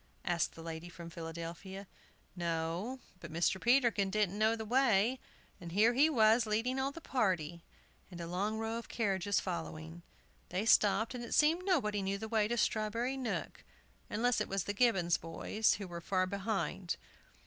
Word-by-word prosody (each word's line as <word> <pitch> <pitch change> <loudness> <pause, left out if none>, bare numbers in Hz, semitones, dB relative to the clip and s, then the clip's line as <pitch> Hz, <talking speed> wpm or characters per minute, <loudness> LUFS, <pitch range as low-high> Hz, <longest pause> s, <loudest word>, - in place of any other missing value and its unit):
asked 175 -1 0
the 165 - -9
lady 165 +1 -6
from 170 -1 -10
Philadelphia. 170 +4 -7 0.5
No! 170 +8 -2 0.2
But 170 -3 -9
Mr. 170 +3 +1
Peterkin 235 -5 +3
didn't 205 0 0
know 220 +1 +4
the 220 -1 -5
way; 240 0 +3 0.4
and 170 -1 -8
here 220 +5 +5
he 285 +6 +5
was 225 -4 +4
leading 230 +5 0
all 270 +1 0
the 330 - -9
party, 175 - -1 0.5
and 175 -2 -9
a 170 - -4
long 195 +6 -1
row 225 +1 -2
of 235 - -11
carriages 200 -3 0
following. 165 -2 -5 0.5
They 185 +4 -1
stopped, 220 +1 +4
and 245 -1 -5
it 235 - -2
seemed 325 +4 +4
nobody 215 - +1
knew 195 +1 -1
the 220 +2 -5
way 220 -1 +2
to 240 +2 -1
Strawberry 230 +4 0
Nook, 260 -3 -4 0.5
unless 235 +2 +1
it - - -2
was 195 -1 0
the 205 - -3
Gibbons 190 -7 +3
boys, 205 +6 0
who 200 -2 -6
were 170 -1 -7
far 185 +1 +1
behind. 195 -2 -2
205 Hz, 170 wpm, -33 LUFS, 175-230 Hz, 0.5 s, here